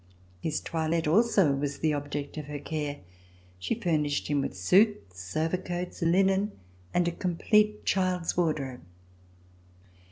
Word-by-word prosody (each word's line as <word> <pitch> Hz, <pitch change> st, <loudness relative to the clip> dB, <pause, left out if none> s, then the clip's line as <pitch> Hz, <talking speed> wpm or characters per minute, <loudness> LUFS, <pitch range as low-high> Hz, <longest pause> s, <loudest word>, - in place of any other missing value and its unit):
His 155 Hz, -, -2 dB
toilette 160 Hz, 0 st, -1 dB
also 195 Hz, -2 st, +4 dB
was 140 Hz, 0 st, -2 dB
the 155 Hz, -1 st, +1 dB
object 145 Hz, 0 st, -4 dB
of 155 Hz, -2 st, -5 dB
her 145 Hz, 0 st, -5 dB
care. 150 Hz, -1 st, -4 dB, 0.6 s
She 160 Hz, -, -1 dB
furnished 155 Hz, -9 st, 0 dB
him 145 Hz, -1 st, +2 dB
with 95 Hz, -, -4 dB
suits, 95 Hz, -, +2 dB
overcoats, 175 Hz, +3 st, -2 dB
linen 195 Hz, +4 st, +2 dB, 0.4 s
and 175 Hz, -1 st, +2 dB
a -, -, +1 dB
complete 210 Hz, +5 st, +1 dB
child's 185 Hz, -3 st, +1 dB
wardrobe. 150 Hz, -7 st, -1 dB
165 Hz, 125 wpm, -28 LUFS, 145-185 Hz, 0.6 s, also